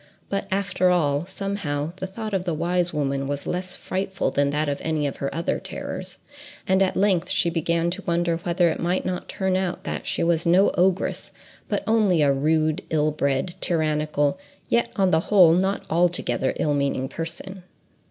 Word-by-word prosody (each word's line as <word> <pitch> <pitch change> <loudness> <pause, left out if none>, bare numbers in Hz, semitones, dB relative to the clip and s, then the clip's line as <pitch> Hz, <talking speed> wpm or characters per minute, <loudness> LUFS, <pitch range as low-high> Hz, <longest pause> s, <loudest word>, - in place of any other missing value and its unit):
But 195 0 -2
after 190 -1 +1
all, 155 -3 +1
somehow, 185 -6 -3
the 190 - -4
thought 215 +2 -6
of 190 -2 0
the 175 -3 -2
wise 175 +2 0
woman 140 -2 -1
was 145 0 -3
less 180 +1 -3
frightful 190 0 -2
than 140 0 +2
that 150 +1 0
of 140 -1 -2
any 155 -2 0
of 140 - -3
her 140 - -2
other 165 - -1
terrors, - - -6 0.5
and 190 +1 +3
at 190 - +2
length 190 -3 +2
she 170 - +1
began 170 +1 0
to 195 +3 -4
wonder 170 -1 +1
whether 170 0 +1
it - - -4
might 175 +2 0
not 185 -1 -3
turn 190 -1 -1
out 185 -1 -2
that - - -4
she - - 0
was 165 -1 +2
no 180 +4 +4
ogress, 185 +1 +1 0.4
but - - -1
only 205 -8 +3
a 140 -1 +4
rude, 155 +4 +1
ill 155 -1 +2
bred, 140 +2 0
tyrannical, 155 -1 +1 0.3
yet 235 0 +2
on 190 -3 +2
the 160 - +4
whole 180 -6 +7
not 190 +3 +1
altogether 165 -7 +1
ill 150 - 0
meaning 140 -2 0
person. 170 +5 -6
170 Hz, 180 wpm, -24 LUFS, 150-185 Hz, 0.5 s, whole